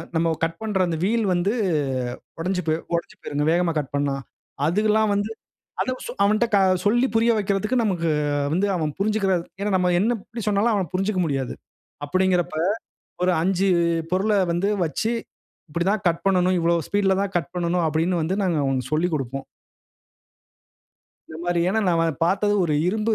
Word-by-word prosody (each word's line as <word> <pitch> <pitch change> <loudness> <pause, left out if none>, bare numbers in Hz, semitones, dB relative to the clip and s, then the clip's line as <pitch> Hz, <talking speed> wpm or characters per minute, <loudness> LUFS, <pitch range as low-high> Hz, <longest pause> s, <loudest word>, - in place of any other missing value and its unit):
நம்ம 165 0 +2
கட் 165 0 -1
பண்ற 210 -3 -1
அந்த 165 -2 -2
வீல் 225 +3 +1
வந்து, 180 +4 +1 0.9
உடஞ்சு 180 +2 -1
போயி 155 0 +1 0.2
உடஞ்சு 170 - -3
போயிருங்க, 145 0 -2
வேகமா 175 0 +2
கட் 145 -3 -4
பண்ணா. 140 -1 0 0.5
அதுவெல்லாம் 215 +5 +2
வந்து, 205 +2 -1 0.5
அத - - -1
வ - - -14
சொ - - -4
அவன்ட்ட 215 +3 +3
க - - +6 0.3
சொல்லி 240 +5 +3
புரிய 230 +1 +4
வக்கிறத்துக்கு 210 +4 0
நமக்கு 175 -6 0 0.4
வந்து 190 +5 +2
அவன் 155 -3 -1
புரிஞ்சுக்கிற 205 -1 +1 0.3
ஏன்னா, 205 +1 0
நம்ம 180 -1 +2
என்ன 230 +5 +2
எப்படி 230 -1 -7
சொன்னாலும் 210 +3 +2
அவன் 190 -6 -1
புரிஞ்சுக்க 190 +1 0
முடியாது. 135 -5 -2 0.5
அப்படீங்கிறப்ப, 180 +1 +1 0.7
ஒரு 180 - +3
5 190 +2 +1 0.4
பொருள 190 +4 +1 0.2
வந்து 175 +4 0 0.2
வச்சு, 195 +7 -1 0.6
"இப்படி 170 +3 -1
தான் 215 -1 -1
கட் 170 0 -1
பண்ணனும். 185 -1 +3
இவ்வளோ 170 +1 +2
ஸ்பீடுல 195 -2 +2
தான் 200 -1 -4
கட் 175 0 -2
பண்ணனும்." 175 0 0
அப்படின்னு 165 +3 0
வந்து 175 +5 -1
நாங்க 175 -4 +1
அவனுக்கு 130 -1 -1
சொல்லிக் 165 +2 +1
குடுப்போம். 135 -1 -4 1.8
இந்த 160 - -8
மாரி, 175 -1 +1
ஏன்னா 220 +4 +1
நான் 170 -2 +2
வ - - +2 0.2
பாத்தது 200 +4 +2
ஒரு 155 -3 0
இரும்பு 220 +3 +1
185 Hz, 165 wpm, -23 LUFS, 165-205 Hz, 1.8 s, க